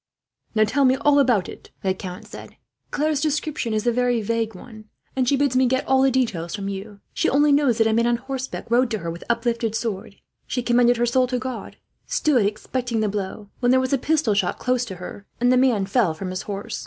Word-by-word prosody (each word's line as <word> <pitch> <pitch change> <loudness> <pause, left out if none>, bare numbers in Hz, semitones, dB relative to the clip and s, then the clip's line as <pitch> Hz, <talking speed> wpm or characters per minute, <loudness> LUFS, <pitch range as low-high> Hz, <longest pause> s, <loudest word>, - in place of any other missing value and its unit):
"Now, 215 - +5
tell 260 +6 +1
me 260 0 +5
all 285 +2 +3
about 245 -9 +3
it," - - -11
the 190 -1 +1
count 185 -1 -8
said. - - -11 0.3
"Claire's 300 0 0
description 305 -4 -1
is 215 +1 -1
a 240 - +3
very 245 0 +1
vague 225 0 -2
one, 215 +2 -12 0.3
and 255 -2 +1
she 280 - +3
bids 280 -2 +1
me 255 0 +4
get 260 +2 0
all 265 0 +4
the 270 - +5
details 220 -10 -1
from 200 -1 -4
you. 200 +1 -7
She - - +1
only 290 +2 +4
knows 280 -5 +3
that 225 - +3
a 220 - +2
man 235 +1 +2
on 240 0 +2
horseback 265 +2 -5
rode 245 0 +3
at 215 - -5
her, 165 0 -3
with 170 - -8
uplifted 230 -1 0
sword. 205 -3 -4 0.3
She 250 - -2
commended 240 0 +3
her 240 - +2
soul 255 +2 +2
to 250 0 -1
God, 255 0 -5
and - - -29
stood 250 -9 +3
expecting 230 +2 -2
the 215 - +1
blow; 200 0 -5
when 245 - +1
there 260 +1 +5
was 260 +2 -1
a 275 - +2
pistol 300 -6 +1
shot, 195 -2 0
close 250 0 0
to 195 -5 -7
her, 180 +3 -9
and 245 +1 +3
the - - +5
man 250 -6 +3
fell 195 -5 +1
from 185 +2 -5
his 185 +1 -3
horse. 200 -1 -5
240 Hz, 240 wpm, -23 LUFS, 210-260 Hz, 0.3 s, Now